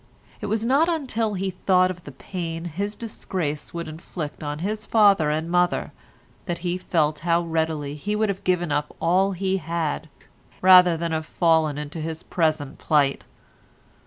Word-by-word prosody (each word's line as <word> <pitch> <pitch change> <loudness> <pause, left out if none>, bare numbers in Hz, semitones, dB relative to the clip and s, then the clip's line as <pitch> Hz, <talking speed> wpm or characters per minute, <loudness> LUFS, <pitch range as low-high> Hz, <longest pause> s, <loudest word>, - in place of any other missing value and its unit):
It - - -3
was 220 +2 -1
not 280 +7 +3
until 230 -10 -1
he 190 0 -2
thought 185 0 +2
of 175 -1 -11
the 145 - -8
pain 165 +3 -5
his 200 +5 -3
disgrace 175 -9 -4
would 170 -1 -5
inflict 155 -1 -7
on 145 0 -3
his 210 +6 -3
father 200 -8 +5
and 155 +2 -1
mother 175 +1 +1 0.6
that 175 -2 -1
he 175 +1 -1
felt 155 -4 0
how 170 +1 +2
readily 160 -3 -1
he 205 +8 -3
would 215 +1 +1
have 195 -1 -3
given 175 -3 +1
up 145 +1 -1
all 190 +4 +2
he 190 +1 0
had, 160 -2 -3 0.5
rather 180 -2 +7
than 170 0 -2
have 160 0 -2
fallen 160 -4 +2
into 150 +2 -5
his 160 +1 -5
present 155 -5 -1
plight. 140 -3 +2
170 Hz, 165 wpm, -24 LUFS, 155-190 Hz, 0.6 s, rather